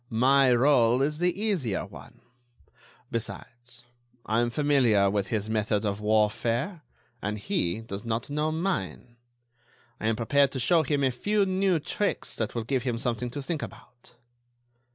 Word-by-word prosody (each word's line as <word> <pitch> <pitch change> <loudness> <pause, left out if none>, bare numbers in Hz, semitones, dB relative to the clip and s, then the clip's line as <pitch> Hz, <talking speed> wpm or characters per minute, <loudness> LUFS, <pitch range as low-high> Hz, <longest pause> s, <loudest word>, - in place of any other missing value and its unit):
My 130 +4 +4
rôle 125 0 +4
is 150 +1 -3
the 180 +1 +1
easier 175 - 0
one. - - -14 0.9
Besides, 120 +1 -6 0.4
I 110 +2 +1
am 120 0 +1
familiar 120 -8 +3
with 100 -1 -1
his 110 -3 -2
method 110 -1 0
of 100 0 -2
warfare, 115 - +1 0.4
and 105 +1 -2
he 110 - -1
does 105 -2 -6
not 115 0 -2
know 150 +2 -1
mine. 125 - -3 0.8
I 110 - -2
am 115 - +2
prepared 140 +5 +2
to 130 - -3
show 165 +7 +4
him 145 -1 0
a 130 - +3
few 205 +11 +1
new 190 -1 +2
tricks 200 +6 -2
that 110 0 -3
will 115 - -1
give 130 +3 -1
him 120 -2 -2
something 120 0 -2
to 140 +3 -6
think 155 +1 -3
about." 120 0 -11
120 Hz, 155 wpm, -27 LUFS, 110-145 Hz, 0.9 s, My